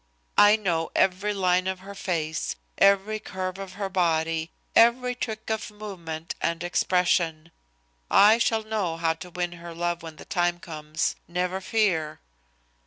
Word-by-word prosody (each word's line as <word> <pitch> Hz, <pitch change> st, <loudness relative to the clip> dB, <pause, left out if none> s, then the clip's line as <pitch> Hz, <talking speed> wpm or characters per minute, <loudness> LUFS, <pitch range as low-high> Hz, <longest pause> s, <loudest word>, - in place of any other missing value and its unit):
I 205 Hz, +1 st, +8 dB
know 175 Hz, -6 st, -1 dB
every 190 Hz, +2 st, +2 dB
line 185 Hz, -2 st, +2 dB
of 190 Hz, 0 st, -3 dB
her 200 Hz, +1 st, -9 dB
face, 165 Hz, -6 st, -2 dB, 0.2 s
every 200 Hz, +2 st, +4 dB
curve 185 Hz, -2 st, -5 dB
of 195 Hz, -1 st, -7 dB
her 200 Hz, 0 st, -3 dB
body, 165 Hz, -3 st, 0 dB, 0.3 s
every 250 Hz, +2 st, +5 dB
trick 220 Hz, -3 st, -4 dB
of 220 Hz, 0 st, -2 dB
movement 175 Hz, -7 st, -6 dB
and 165 Hz, 0 st, -1 dB
expression. 175 Hz, -2 st, +1 dB, 0.6 s
I 215 Hz, +3 st, +6 dB
shall 225 Hz, -1 st, +1 dB
know 210 Hz, -7 st, -2 dB
how 165 Hz, -1 st, +1 dB
to 165 Hz, +2 st, -10 dB
win 175 Hz, 0 st, -3 dB
her 170 Hz, -1 st, -9 dB
love 175 Hz, 0 st, -1 dB
when 160 Hz, -1 st, -9 dB
the -, -, -12 dB
time 175 Hz, -1 st, 0 dB
comes, 155 Hz, -1 st, -3 dB
never 180 Hz, +2 st, -2 dB
fear." 185 Hz, -8 st, 0 dB
180 Hz, 150 wpm, -26 LUFS, 165-205 Hz, 0.6 s, I